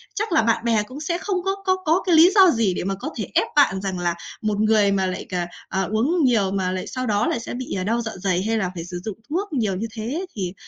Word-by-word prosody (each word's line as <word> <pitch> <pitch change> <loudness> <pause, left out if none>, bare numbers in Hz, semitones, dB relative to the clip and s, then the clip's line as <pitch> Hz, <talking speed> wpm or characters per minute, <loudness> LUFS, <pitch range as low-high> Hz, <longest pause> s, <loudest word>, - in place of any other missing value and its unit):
chắc 425 0 -2
là 325 - +4
bạn 230 +1 +1
bè 225 -3 +2
cũng 255 +7 -10
sẽ 340 +2 -1
không 385 +1 -2
có 390 0 +1
có 375 -1 +3
có 325 +4 +2
cái 355 -3 +4
lý 330 +3 +8
do 385 -3 +8
gì 225 - +1
để - - -3
mà 195 +1 -1
có 195 - -5
thể - - -4
ép - - +3
bạn 235 -10 +4
rằng 190 -2 -3
là 175 -1 0 0.3
một 210 -1 -1
người 215 -2 +4
mà 195 -1 +1
lại, 185 0 -4
ờ, 180 - -1 0.3
ờ, 190 -1 -1
uống 290 +11 +1
nhiều 220 -7 +3
mà 190 -2 -1
lại 185 0 -4
sau 255 0 -4
đó 210 0 +1
lại - - 0
sẽ 230 - -6
bị 250 -3 -4
đau 230 +3 +1
dạ 220 -1 -4
dày 185 -1 0
hay 225 +2 0
là 185 -4 -1
phải 165 - -5
sử 175 0 -6
dụng 215 -4 -5
thuốc 365 +3 -2
nhiều 215 -8 0
như 215 +5 -3
thế, 245 +11 -3
thì 185 -4 -3
220 Hz, 280 wpm, -22 LUFS, 195-290 Hz, 0.3 s, lý